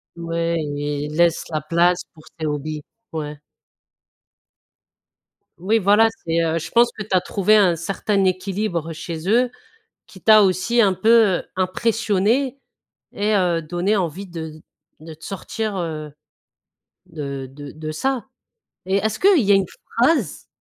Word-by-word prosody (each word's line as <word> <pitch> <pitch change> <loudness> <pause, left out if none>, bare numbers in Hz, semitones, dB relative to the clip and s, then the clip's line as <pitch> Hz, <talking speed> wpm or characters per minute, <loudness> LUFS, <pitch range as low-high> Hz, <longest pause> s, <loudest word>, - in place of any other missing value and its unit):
Ouais, 170 0 -2
i 145 0 -3
il 150 +1 -6
laisse 170 -1 +3
la 155 -1 -1
place 170 +3 +2
pour 155 - -16 0.2
ses 155 - -2
hobbies, 150 0 -3 0.3
ouais. 150 -1 -4 2.2
Oui, 210 +5 +2
voilà, 210 +2 +5 0.2
c'est, 165 0 +1
heu, 165 0 0
je 165 - -6
pense 240 0 +5
que 210 - -4
tu 215 - -17
as 180 - +4
trouvé 205 +2 +2
un 185 -5 +4
certain 195 +4 -1
équilibre 185 -3 -1
chez 165 +2 -5
eux, 245 +2 +3 0.5
qui 190 - -16
t'a 215 -1 +7
aussi 190 +6 +1
un 195 -3 +4
peu, 220 +5 0 0.3
heu, - - -8
impressionnée 225 +6 0 0.5
et 210 +1 0
heu, 175 -3 +1
donné 175 +6 -1
envie 185 +2 -3
de 160 -2 -8 0.4
de 160 0 -9
te 160 - -14
sortir, 210 +1 -4
heu, 155 -3 -4 1.0
de 140 -5 -6
de 145 0 -10
de 155 0 -6
ça. 265 +5 -2 0.6
Et 190 +1 +1
est-ce 215 +1 -1
qu'il 380 -7 +5
y 200 - +2
a - - +7
une 195 -1 +2 0.3
phrase 295 +7 +1
180 Hz, 150 wpm, -21 LUFS, 160-210 Hz, 2.2 s, t'a